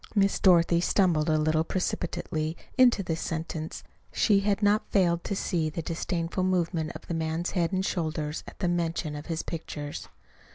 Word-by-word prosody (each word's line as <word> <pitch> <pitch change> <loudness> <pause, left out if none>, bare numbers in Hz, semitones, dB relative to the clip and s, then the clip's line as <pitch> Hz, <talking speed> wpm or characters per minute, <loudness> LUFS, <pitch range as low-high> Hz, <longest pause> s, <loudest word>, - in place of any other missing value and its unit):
(Miss 200 -1 +3
Dorothy 170 -2 +5
stumbled 170 -5 +2
a 155 - +3
little 155 +1 +2
precipitately 165 -2 -2 0.2
into 245 -6 +5
this 165 -2 -2
sentence 160 -1 -4 0.3
she 205 -3 +3
had 200 +1 0
not 205 +1 +3
failed 175 -4 +2
to 200 - -2
see 165 -4 0
the 160 +2 -5
disdainful 170 +2 -2
movement 170 -3 0
of - - -9
the - - -4
man's 165 +1 -1
head 175 -3 0
and 190 0 0
shoulders 155 -4 -2
at - - -11
the 185 - -1
mention 170 -3 -1
of 145 +1 -8
his 165 -1 -2
pictures.) 150 -3 -6
170 Hz, 170 wpm, -28 LUFS, 160-185 Hz, 0.3 s, Dorothy